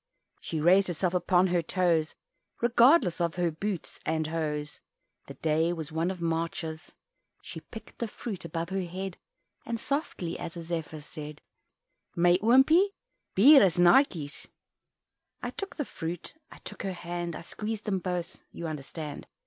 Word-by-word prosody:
She 160 - -4
raised 185 +5 +5
herself 175 +1 -1
upon 180 0 +3
her 175 -1 +2
toes 170 -2 +1 0.4
Regardless 240 - +5
of 170 -1 0
her 175 -2 +1
boots 185 +3 -4
and 160 0 0
hose 150 -2 -3 0.5
(The - - -9
day 160 +2 +1
was 160 -2 -6
one 165 +3 0
of 190 -1 -4
March's), 165 0 -3 0.5
She - - -7
picked 220 -2 -12
the 235 - -1
fruit 210 -2 -6
above 170 0 -4
her 190 0 -1
head, 185 +1 -5 0.5
And 230 -1 -3
softly 255 - -3
as 165 - -6
a 170 - -6
Zephyr 160 -2 -4
said, 150 0 -8 0.8
"Mij 175 +1 +5
oompie, 265 - +6 0.5
bier 275 +9 +9
is 185 -3 +3
nartjes." 175 - +3 1.0
I - - -2
took 395 -1 -6
the 295 - -2
fruit, 165 -4 -6 0.2
I - - -13
took - - -8
her 195 -2 -2
hand 175 -1 -4
I - - -6
squeezed 215 +5 -5
them 195 -3 0
both 180 -1 -4
you 170 - -7
understand? 150 0 -6
175 Hz, 155 wpm, -29 LUFS, 160-195 Hz, 1.0 s, bier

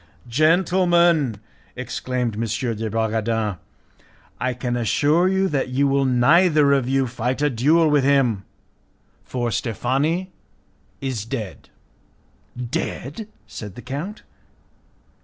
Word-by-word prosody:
"Gentlemen," 170 - +3 0.4
exclaimed 125 -1 -3
M. 105 - -4 0.3
de 110 +1 -3
Bragadin, 110 -2 -1 0.8
"I 130 0 0
can 120 0 -2
assure 145 - +2
you 190 0 +2
that 135 -3 -1
you 135 +3 +2
will 140 0 +2
neither 145 +4 +4
of 135 -3 +1
you 135 0 +2
fight 125 +1 -2
a 145 - +2
duel 155 +8 +3
with 150 -2 +3
him, 130 -8 +2 0.8
for 120 -2 -3
Steffani 140 - -1 0.7
is 130 -6 -3
dead." 115 -4 -6 0.9
"Dead!" 135 - -4 0.2
said 105 -4 -9
the 125 - -10
count. 165 +11 -6
130 Hz, 110 wpm, -22 LUFS, 120-155 Hz, 0.9 s, neither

